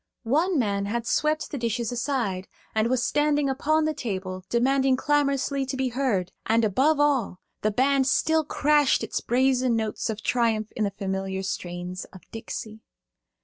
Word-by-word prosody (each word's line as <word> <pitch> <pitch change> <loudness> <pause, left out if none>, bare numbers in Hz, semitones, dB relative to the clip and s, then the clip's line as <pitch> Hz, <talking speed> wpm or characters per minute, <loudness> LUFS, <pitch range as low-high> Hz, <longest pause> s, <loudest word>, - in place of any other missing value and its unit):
One 315 +9 +2
man 200 -5 0
had 235 +2 -2
swept 305 +5 0
the 280 - -4
dishes 235 0 -1
aside, 235 -7 -2 0.3
and 220 +1 +1
was 250 -1 +1
standing 295 -1 +2
upon 310 +3 +1
the 310 - 0
table, 190 -8 -4
demanding 265 +2 +3
clamorously 280 -1 +1
to 265 - -3
be 260 -1 0
heard, 230 -8 -1 0.2
and 225 +1 +3
above 275 +9 +2
all 270 -10 +1 0.2
the 215 - +2
band 265 +4 +2
still 315 +3 +2
crashed 295 -1 +2
its - - -3
brazen 255 0 +2
notes 220 0 -2
of 215 -1 -4
triumph 225 -3 +1
in 215 - 0
the - - 0
familiar 190 -1 -3
strains 180 -1 -5
of 185 - -14
"Dixie." 220 -1 -7
240 Hz, 160 wpm, -25 LUFS, 210-280 Hz, 0.3 s, demanding